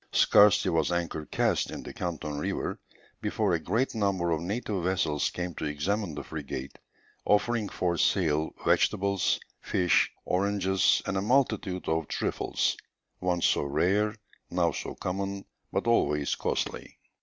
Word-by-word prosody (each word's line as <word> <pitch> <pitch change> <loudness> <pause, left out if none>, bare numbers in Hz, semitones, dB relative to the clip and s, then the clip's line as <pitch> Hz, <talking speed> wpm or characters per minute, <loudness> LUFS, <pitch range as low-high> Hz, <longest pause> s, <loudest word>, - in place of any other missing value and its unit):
Scarcely 105 -1 +5
was 80 -1 +1
anchor 85 -3 -2
cast - - +1
in - - -6
the - - -8
Canton 75 -4 -4
river - - -2 0.4
before 105 -4 0
a 85 - +2
great 115 +10 0
number 100 -6 0
of 80 -1 0
native 100 0 -2
vessels 80 -5 +1
came 90 -1 -4
to 80 - -5
examine 80 +4 -1
the 70 - -5
frigate, 70 -3 -6 0.5
offering 105 +1 +2
for 85 -2 -1
sale 80 -4 +2 0.2
vegetables, 100 -1 +2 0.2
fish, 90 -1 +2 0.2
oranges, 95 0 +2
and 100 - -1
a - - +1
multitude 105 -5 +1
of 80 -1 0
trifles, - - -1 0.4
once 90 -1 0
so - - +3
rare, 90 +9 +1 0.3
now 85 -1 +1
so - - -5
common, 100 +1 -3 0.3
but - - -1
always 75 -11 +2
costly. - - -3
90 Hz, 140 wpm, -28 LUFS, 80-100 Hz, 0.5 s, Scarcely